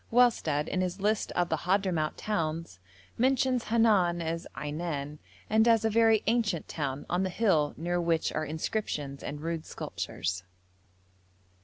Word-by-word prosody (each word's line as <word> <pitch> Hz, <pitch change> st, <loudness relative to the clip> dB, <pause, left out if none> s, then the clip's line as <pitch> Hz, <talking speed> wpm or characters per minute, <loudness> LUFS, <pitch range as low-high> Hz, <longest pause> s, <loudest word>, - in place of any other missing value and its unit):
Wellsted, 225 Hz, -12 st, +3 dB
in 185 Hz, -, -1 dB
his 185 Hz, +1 st, -2 dB
list 210 Hz, +2 st, 0 dB
of 175 Hz, -1 st, +1 dB
the -, -, +1 dB
Hadhramout 180 Hz, -4 st, 0 dB
towns, 165 Hz, -, -2 dB, 0.4 s
mentions 255 Hz, -1 st, +2 dB
Henan 210 Hz, -7 st, +3 dB
as 165 Hz, 0 st, -3 dB
Ainan, 150 Hz, -1 st, -4 dB, 0.3 s
and 220 Hz, +2 st, +4 dB
as 225 Hz, -1 st, +4 dB
a 220 Hz, -, +2 dB
very 225 Hz, -1 st, +4 dB
ancient 215 Hz, -7 st, +1 dB
town, 140 Hz, -3 st, -3 dB
on 175 Hz, +1 st, 0 dB
the 190 Hz, -, 0 dB
hill 175 Hz, -7 st, +2 dB
near 175 Hz, +2 st, -1 dB
which 165 Hz, -1 st, +1 dB
are 155 Hz, -, -1 dB
inscriptions 150 Hz, -3 st, -3 dB
and 145 Hz, +1 st, -6 dB
rude 165 Hz, 0 st, -3 dB
sculptures. 90 Hz, -, -4 dB
175 Hz, 145 wpm, -29 LUFS, 155-220 Hz, 0.4 s, and